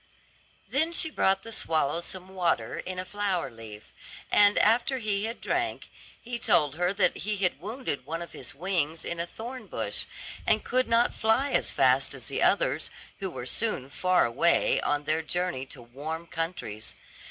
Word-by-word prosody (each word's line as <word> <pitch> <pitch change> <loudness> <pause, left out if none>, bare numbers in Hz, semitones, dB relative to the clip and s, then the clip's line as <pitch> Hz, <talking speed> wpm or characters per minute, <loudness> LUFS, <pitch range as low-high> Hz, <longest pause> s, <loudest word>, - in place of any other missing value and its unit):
Then 320 +5 +1
she 320 -2 +4
brought 195 -7 +2
the 230 - -8
swallow 160 -6 +1
some 185 +1 -4
water 175 -11 0
in 185 0 -5
a 185 - -3
flower 195 -7 -1
leaf, 110 -2 -11 0.4
and 205 0 +6
after 240 +5 +3
he 210 -3 0
had 230 +2 -4
drank, 355 0 -2 0.3
he 240 0 -5
told 145 - +3
her 175 +3 +1
that 200 -1 +2
he 210 +1 -2
had 180 -6 0
wounded 215 - -4
one 165 +5 -4
of 170 - -11
his 125 - -7
wings 165 -1 -1
in 170 - -3
a 170 - -2
thorn 245 +6 -8
bush, - - -1 0.4
and 215 - +3
could 255 +1 +1
not 230 +1 +3
fly 235 +6 +2
as - - +3
fast - - +3
as - - -8
the - - -3
others, - - +2 0.3
who 195 -2 -3
were 125 - -7
soon 140 - 0
far 185 +5 +3
away 140 +9 +3
on 145 0 0
their 155 +2 +1
journey 175 -4 -2
to 130 -3 -10
warm 150 +7 -6
countries. 165 - -5
180 Hz, 175 wpm, -28 LUFS, 155-220 Hz, 0.4 s, and